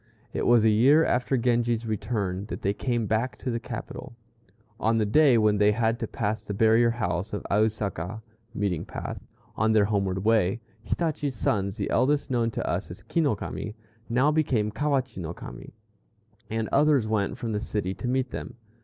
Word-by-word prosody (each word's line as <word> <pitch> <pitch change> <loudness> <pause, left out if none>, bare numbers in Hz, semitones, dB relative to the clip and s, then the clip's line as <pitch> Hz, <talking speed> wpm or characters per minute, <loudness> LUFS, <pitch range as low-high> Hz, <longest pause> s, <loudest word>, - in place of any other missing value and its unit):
It - - -1
was 120 -2 +5
a - - +6
year 135 +9 +5
after 125 +2 +1
Genji's 120 -1 +1
return 105 -3 -2
that - - -6
they 100 - +1
came 120 +1 -1
back 110 +4 -1
to 130 - -3
the 115 - -1
capital. 115 - -7 0.6
On 115 +1 +2
the 110 - +2
day 135 +3 +5
when 105 -1 +3
they 105 0 +5
had 115 +1 0
to 115 - -2
pass 105 +1 -2
the 100 -2 -5
barrier 115 +3 +4
house 95 -4 -2
of 105 - -4
Ausaka 105 -1 -1 0.3
(meeting 100 -7 -1
path) - - -6 0.3
on 110 +1 +2
their 105 -2 +5
homeward 100 -2 -1
way, 110 -2 +3 0.2
Hitachi's 150 -2 -2
sons, 100 -1 -1
the 100 - -2
eldest 145 +1 +2
known 120 -2 +1
to - - -4
us - - -2
as - - -10
Ki 165 - 0
no 145 -8 +2
Kami, 105 +2 -6 0.3
now 130 +6 +3
became 130 -9 +1
Kawachi 135 -3 -1
no 85 +1 -5
Kami, - - -10 0.8
and 110 0 -1
others 140 -5 +3
went 105 -2 0
from 115 - -4
the 105 - -1
city 105 -3 -2
to 125 - -5
meet 130 0 0
them. - - -6
110 Hz, 185 wpm, -26 LUFS, 105-125 Hz, 0.8 s, a